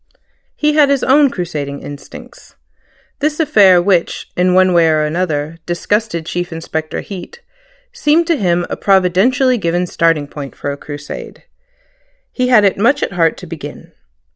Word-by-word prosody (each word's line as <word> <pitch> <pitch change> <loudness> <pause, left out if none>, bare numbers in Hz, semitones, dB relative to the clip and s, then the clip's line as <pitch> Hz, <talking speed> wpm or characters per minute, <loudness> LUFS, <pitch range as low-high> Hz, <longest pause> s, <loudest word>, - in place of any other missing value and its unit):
He 300 0 +1
had 295 -2 +4
his 280 -1 +1
own 280 +1 +4
crusading 150 - -5
instincts. 145 0 -12 0.6
This 300 +2 -1
affair, 205 - +5
which, 175 -1 0
in 180 0 +2
one 185 0 +4
way 170 -1 +4
or 155 -1 +2
another, 155 -1 -2
disgusted 175 0 -1
Chief 175 +1 -4
Inspector 160 -1 -4
Heat, 210 - -9 0.5
seemed 335 -8 +2
to 335 0 +1
him 175 - 0
a - - -4
providentially 205 +7 +2
given 175 0 0
starting 165 -3 +1
point 145 -1 -9
for 145 - -4
a - - -4
crusade. 145 0 -9 0.9
He 250 -1 -1
had 240 -4 +5
it 195 -1 +2
much 275 +7 +2
at - - -2
heart 165 -3 +1
to - - -10
begin. - - -9
180 Hz, 155 wpm, -16 LUFS, 165-250 Hz, 0.9 s, affair